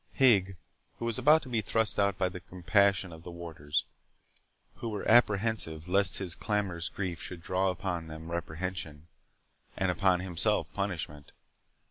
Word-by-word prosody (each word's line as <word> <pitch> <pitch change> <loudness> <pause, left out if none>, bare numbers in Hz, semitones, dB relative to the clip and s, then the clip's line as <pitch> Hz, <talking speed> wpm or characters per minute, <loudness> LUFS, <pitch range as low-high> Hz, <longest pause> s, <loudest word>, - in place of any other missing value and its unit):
Higg 100 -8 +4 0.4
was 115 -2 -2
about 155 +2 +5
to 130 - -9
be 115 -3 +1
thrust 110 +2 0
out 100 -1 +2
by 95 - +2
the 90 0 -6
compassion 90 0 +1
of 80 - -11
the 85 - -9
warders, 85 -4 -3 0.9
who 115 - -4
were 105 -2 -4
apprehensive 105 -8 +3
lest 100 +1 +3
his 95 -3 -2
clamorous 95 -5 -2
grief 90 -4 -4
should 85 -2 -8
draw 95 +2 +1
upon 90 -2 -3
them 80 +1 -8
reprehension, 85 -2 -4 0.7
and 95 -1 +1
upon 90 -1 +2
himself 95 +4 0
punishment. 85 -7 -4
95 Hz, 145 wpm, -30 LUFS, 85-100 Hz, 0.9 s, about